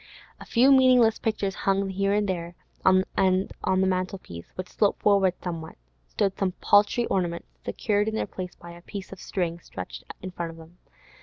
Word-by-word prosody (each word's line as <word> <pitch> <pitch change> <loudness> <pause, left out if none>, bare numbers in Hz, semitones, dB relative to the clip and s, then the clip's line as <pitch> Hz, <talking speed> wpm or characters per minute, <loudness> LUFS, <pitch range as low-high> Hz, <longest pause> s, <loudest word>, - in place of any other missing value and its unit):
A - - -10
few 255 +4 +4
meaningless 255 -4 +5
pictures 210 -4 -1
hung 195 0 0
here 195 +1 0
and 205 0 +2
there, 175 -2 -3 0.3
and 185 0 +5 0.6
on 190 0 +2
the - - +3
mantel 185 +1 0
piece, 85 - -10
which 185 0 -6
sloped 205 - 0
forward 195 -3 +4
somewhat, 165 -3 -5 0.3
stood 190 - 0
some 190 -2 0
paltry 205 +6 +3
ornaments, 175 -5 -2
secured 210 -1 0
in 220 - -1
their - - 0
places 185 -2 -7
by 170 - -11
a 170 0 -12
piece 195 +2 -8
of 195 - -9
string 170 -3 -2
stretched - - -8 0.2
in 185 - -5
front 170 -1 -4
of 165 - -10
them. 165 +2 -15
190 Hz, 185 wpm, -26 LUFS, 175-205 Hz, 0.6 s, meaningless